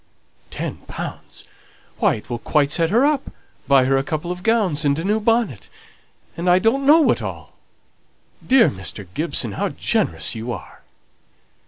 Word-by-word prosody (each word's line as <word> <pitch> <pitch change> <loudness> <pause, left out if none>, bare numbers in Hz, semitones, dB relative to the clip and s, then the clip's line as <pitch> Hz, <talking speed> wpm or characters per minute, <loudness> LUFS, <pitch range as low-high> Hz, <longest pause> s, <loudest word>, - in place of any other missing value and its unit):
Ten - - -5
pounds! - - -8 0.6
Why, - - +3
it 105 - -11
will 120 -1 -4
quite 145 +1 +1
set 165 0 +1
her 235 +8 +3
up, 290 -2 0 0.4
buy 135 -2 +5
her 135 +1 +2
a 135 - 0
couple 155 +4 -4
of 180 0 -6
gowns 195 -9 +1
and 140 -1 +1
a 165 - -3
new 210 +3 +1
bonnet, 225 - 0 0.7
and 175 +2 -1
I 175 - +6
don't 245 +8 +1
know 315 +3 +7
what - - +2
all! - - -7 0.9
Dear 255 -3 +5
Mr. 95 +1 -7
Gibson, 145 -7 -1
how - - -2
generous 80 -2 -1
you 115 +2 -5
are!" - - -11
165 Hz, 165 wpm, -21 LUFS, 135-225 Hz, 0.9 s, know